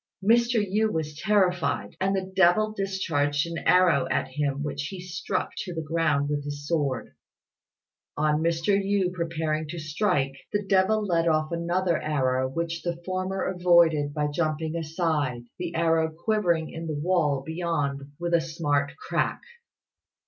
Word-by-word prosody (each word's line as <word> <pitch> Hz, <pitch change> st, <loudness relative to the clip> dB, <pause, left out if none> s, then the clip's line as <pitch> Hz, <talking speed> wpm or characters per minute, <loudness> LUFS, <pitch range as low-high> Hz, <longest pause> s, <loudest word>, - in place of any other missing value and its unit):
Mr. 235 Hz, +2 st, +4 dB
Yü 215 Hz, +3 st, +1 dB
was 155 Hz, -2 st, -3 dB
terrified; 180 Hz, 0 st, +1 dB
and 195 Hz, +1 st, +2 dB
the 190 Hz, 0 st, -3 dB
devil 195 Hz, +4 st, +4 dB
discharged 165 Hz, -7 st, 0 dB
an 170 Hz, 0 st, -4 dB
arrow 180 Hz, -5 st, +4 dB
at -, -, 0 dB
him 140 Hz, +1 st, -2 dB
which 145 Hz, -1 st, -3 dB
he 190 Hz, -, -7 dB
struck 180 Hz, 0 st, -3 dB
to 180 Hz, -3 st, -5 dB
the 160 Hz, -, -3 dB
ground 155 Hz, -3 st, +1 dB
with 145 Hz, 0 st, -2 dB
his 145 Hz, 0 st, -6 dB
sword. 145 Hz, -6 st, -1 dB, 1.0 s
On 150 Hz, +1 st, +2 dB
Mr. 165 Hz, +4 st, +2 dB
Yü 195 Hz, -2 st, +1 dB
preparing 160 Hz, -3 st, -2 dB
to 170 Hz, +3 st, -6 dB
strike, 155 Hz, -3 st, 0 dB, 0.2 s
the 205 Hz, -1 st, -1 dB
devil 195 Hz, +3 st, +3 dB
let 170 Hz, -3 st, +1 dB
off 155 Hz, -1 st, +1 dB
another 170 Hz, +1 st, 0 dB
arrow 130 Hz, -3 st, 0 dB
which 170 Hz, +4 st, -3 dB
the 170 Hz, -1 st, -3 dB
former 185 Hz, +1 st, -2 dB
avoided 170 Hz, -5 st, +3 dB
by 150 Hz, 0 st, -1 dB
jumping 155 Hz, +1 st, -1 dB
aside, 155 Hz, -6 st, -1 dB, 0.2 s
the 175 Hz, -1 st, -4 dB
arrow 165 Hz, -1 st, +2 dB
quivering 170 Hz, -2 st, 0 dB
in 165 Hz, 0 st, -6 dB
the 155 Hz, -, -2 dB
wall 150 Hz, -4 st, +1 dB
beyond 145 Hz, -4 st, -2 dB
with 170 Hz, 0 st, -2 dB
a 170 Hz, -, +5 dB
smart 150 Hz, -4 st, -1 dB
crack. 435 Hz, +1 st, -1 dB
165 Hz, 150 wpm, -26 LUFS, 150-185 Hz, 1.0 s, a